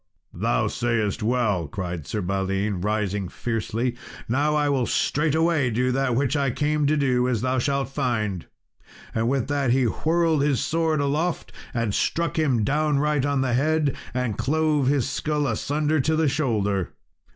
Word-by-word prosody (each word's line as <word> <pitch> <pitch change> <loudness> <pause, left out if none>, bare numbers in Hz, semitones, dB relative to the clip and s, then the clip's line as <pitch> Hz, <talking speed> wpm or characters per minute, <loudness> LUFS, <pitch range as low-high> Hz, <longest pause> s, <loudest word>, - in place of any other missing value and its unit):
"Thou - - 0
sayest 115 -4 -1
well," 105 -7 +1
cried 85 -2 -5
Sir 105 - -2
Balin, 95 +1 -1
rising 105 -2 -1
fiercely; 115 +3 -2 0.3
"now 145 +6 +1 0.2
will 140 - +1
I - - +1
straightway 155 0 +1
do 125 +3 +1
that 130 -1 0
which 135 +2 +1
I 140 -2 +1
came 150 +2 0
to 155 +1 +2
do, 125 -3 +2
as 120 -4 0
thou 130 +1 0
shalt 140 -1 0
find." 110 -9 -2 0.7
With 120 +3 0
that 140 -3 0
he 130 +2 +3
whirled 160 +5 +1
his 140 -3 +2
sword 160 -2 0
aloft 155 +5 -1 0.2
and 115 -4 -1
struck 165 +6 0
him 130 -8 +2
downright 150 +1 +1
on 140 -2 +1
the 130 -2 0
head, 150 +2 +1 0.2
and 125 -4 -2
clove 150 -2 +1
his 140 -3 +2
skull 150 +1 -1
asunder 150 +5 0
to 160 +4 +1
the 160 -1 +2
shoulder. 105 - 0
130 Hz, 155 wpm, -24 LUFS, 110-150 Hz, 0.7 s, he